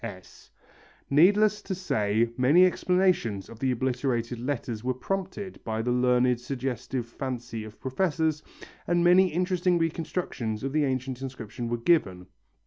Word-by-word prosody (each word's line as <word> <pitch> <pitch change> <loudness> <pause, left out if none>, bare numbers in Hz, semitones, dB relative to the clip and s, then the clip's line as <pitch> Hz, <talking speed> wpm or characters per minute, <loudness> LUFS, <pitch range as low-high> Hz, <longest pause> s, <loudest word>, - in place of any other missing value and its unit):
S. 95 -5 -10 0.6
Needless 205 +7 +4
to 190 - -4
say 115 - 0
many 140 +9 +5
explanations 180 - +1
of 115 - -12
the 130 - 0
obliterated 125 -1 -1
letters 120 -4 -3
were 130 0 -1
prompted 195 +5 -4
by 110 0 -2
the 125 - 0
learned 125 0 +3
suggestive 125 -1 -3
fancy 120 -2 -5
of 110 0 -12
professors, 155 +2 0 0.5
and 175 0 +2
many 180 +2 +6
interesting 180 +1 +1
reconstructions 160 -9 -2
of 135 0 -3
the 150 -1 +2
ancient 130 -1 -3
inscription 120 -3 -6
were 120 - -1
given. 115 - +1
130 Hz, 135 wpm, -27 LUFS, 120-175 Hz, 0.6 s, many